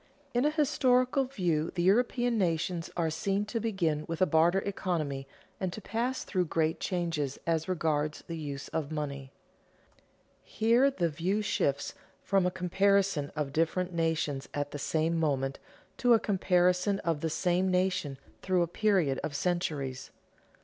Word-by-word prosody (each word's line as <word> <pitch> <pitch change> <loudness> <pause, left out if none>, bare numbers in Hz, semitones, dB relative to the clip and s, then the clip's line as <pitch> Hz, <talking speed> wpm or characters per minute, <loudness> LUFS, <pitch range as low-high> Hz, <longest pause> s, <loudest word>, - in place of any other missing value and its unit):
_In 245 +4 +3
a - - +4
historical 270 -3 +2
view 175 - -1
the 175 - 0
European 240 +4 +2
nations 170 -3 0
are 165 -2 +1
seen 195 +5 -1
to 230 +2 -3
begin 175 -9 0
with 165 -1 -4
a 185 - +5
barter 170 +3 +3
economy 155 -9 -2 0.3
and 185 -2 -2
to - - -6
pass 235 +5 -2
through 180 -2 0
great 160 0 0
changes 165 -6 -2
as 165 0 0
regards 155 -4 -1
the 165 - -5
use 145 -3 -5
of 155 -2 -3
money._ 140 -3 -4 1.1
Here 235 +5 +3
the 180 -11 0
view 180 +7 -1
shifts 140 -8 0 0.3
from 195 -2 +2
a - - +3
comparison 190 -3 +1
of 145 -3 -2
different 175 +3 0
nations 160 -4 -1
at 145 0 -2
the 145 - -5
same 165 +3 0
moment 135 -3 0 0.4
to 245 -2 +5
a - - +3
comparison 180 -1 +2
of 165 -4 -1
the 160 - 0
same 180 +3 +1
nation 180 -6 0 0.2
through 185 -2 +2
a - - -1
period 175 -7 +1
of 150 -1 -3
centuries. 145 -7 -2
175 Hz, 155 wpm, -30 LUFS, 155-195 Hz, 1.1 s, a